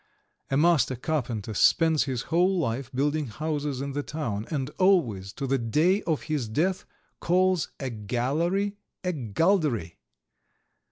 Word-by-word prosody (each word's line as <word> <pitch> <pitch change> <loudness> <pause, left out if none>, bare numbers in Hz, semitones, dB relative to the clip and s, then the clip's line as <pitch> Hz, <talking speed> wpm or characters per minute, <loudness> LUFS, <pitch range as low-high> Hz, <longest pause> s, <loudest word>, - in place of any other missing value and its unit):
A 135 - +1
master 155 -4 +3
carpenter 120 -6 -3
spends 160 +7 +4
his 130 -4 -2
whole 185 +3 +3
life 130 -4 -2
building 145 +2 0
houses 145 +2 -3
in 140 0 -3
the 145 +1 -2
town, 120 -9 -4
and 140 -3 -2
always, 125 - +2
to 140 - -4
the 135 0 +1
day 155 - +2
of 160 -3 0
his 150 -7 -2
death, 175 +11 0 0.3
calls 185 -1 +2
a 135 -2 -3
"gallery" 150 - -1 0.3
a 180 0 0
"galdery." 135 - 0
145 Hz, 135 wpm, -27 LUFS, 125-170 Hz, 0.3 s, spends